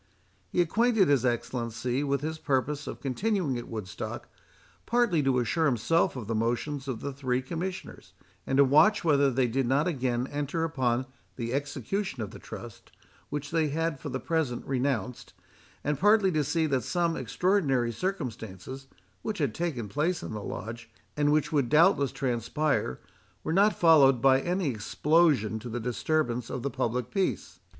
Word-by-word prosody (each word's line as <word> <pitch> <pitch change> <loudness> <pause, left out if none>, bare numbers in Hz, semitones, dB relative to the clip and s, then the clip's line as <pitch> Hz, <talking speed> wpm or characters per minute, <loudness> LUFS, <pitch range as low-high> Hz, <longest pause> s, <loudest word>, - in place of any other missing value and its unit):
He 180 - +2
acquainted 220 +2 +3
his 140 -4 +3
Excellency 120 +1 -1
with 140 -1 0
his 160 +1 -4
purpose 145 +1 -1
of - - -6
continuing 165 - 0
at 120 - -8
Woodstock, 105 -5 -6 0.6
partly 235 -9 +2
to 135 -2 +2
assure 155 +7 +1
himself 165 - +2
of 125 -4 -5
the 115 - -2
motions 120 +5 -1
of 125 -4 -4
the 140 - -4
three 130 -2 -1
Commissioners, 175 +7 -6 0.3
and 135 - +1
to 140 - +8
watch 180 +11 +5
whether 145 -4 +4
they 130 0 +1
did 125 +2 0
not 140 +6 +2
again 125 -6 -1
enter 145 +3 -2
upon 130 -6 0 0.3
the 120 -1 -4
execution 145 - -2
of 100 - -7
the - - -10
trust, - - -10 0.4
which 145 0 -4
they 165 -2 +2
had 160 0 -1
for 145 - -6
the 130 - -3
present 155 -7 -1
renounced,—and 130 +2 -4
partly 205 -1 +4
to 155 -3 +1
see 160 +3 +1
that 135 -4 +1
some 170 +1 0
extraordinary 145 -14 +1
circumstances, 130 - -5 0.3
which 215 -2 -3
had 140 -8 0
taken 145 -9 -3
place 155 - -1
in - - -6
the 105 - -4
Lodge, 115 +3 -7 0.3
and 145 0 +2
which 150 -1 +1
would 140 -6 +1
doubtless 155 -3 +4
transpire, 130 - -1 0.4
were 160 - -1
not 205 +4 +4
followed 145 -6 +6
by 135 +2 +4
any 180 -1 0
explosion 130 0 +2
to 120 +2 -8
the 120 +2 -3
disturbance 125 0 -1
of 125 - -4
the 140 - -2
public 125 -1 -2
peace. 195 -2 -2
140 Hz, 165 wpm, -28 LUFS, 125-165 Hz, 0.6 s, to